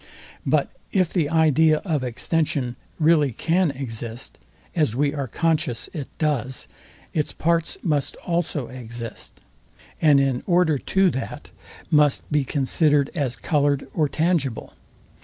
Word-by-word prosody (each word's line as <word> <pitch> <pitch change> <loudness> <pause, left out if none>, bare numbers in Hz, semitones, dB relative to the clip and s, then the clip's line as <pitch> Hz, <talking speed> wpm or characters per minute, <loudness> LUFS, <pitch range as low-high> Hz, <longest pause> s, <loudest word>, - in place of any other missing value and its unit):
But - - +2 0.2
if 185 -4 +1
the 160 -6 +1
idea 160 -1 +4
of 155 -7 0
extension 125 0 -1 0.2
really 155 -3 +4
can 170 - +1
exist, 120 -3 -6 0.4
as 150 -9 +1
we 140 +2 +1
are 140 -3 -3
conscious 155 -3 0
it 145 -4 -5
does, 135 -4 -1 0.5
its 150 -2 -1
parts 165 0 0
must 150 -6 0
also 170 -6 -1
exist; 115 -2 -8 0.6
and 150 -3 +6
in 135 -2 +1
order 175 -5 +3
to 190 +4 +2
that, 130 - -6 0.4
must 150 -2 +3
be 150 -1 +2
considered 145 +1 +2
as 140 -7 -1
coloured 145 -1 0
or 155 -3 +1
tangible. 155 -8 -1
150 Hz, 125 wpm, -23 LUFS, 130-160 Hz, 0.6 s, and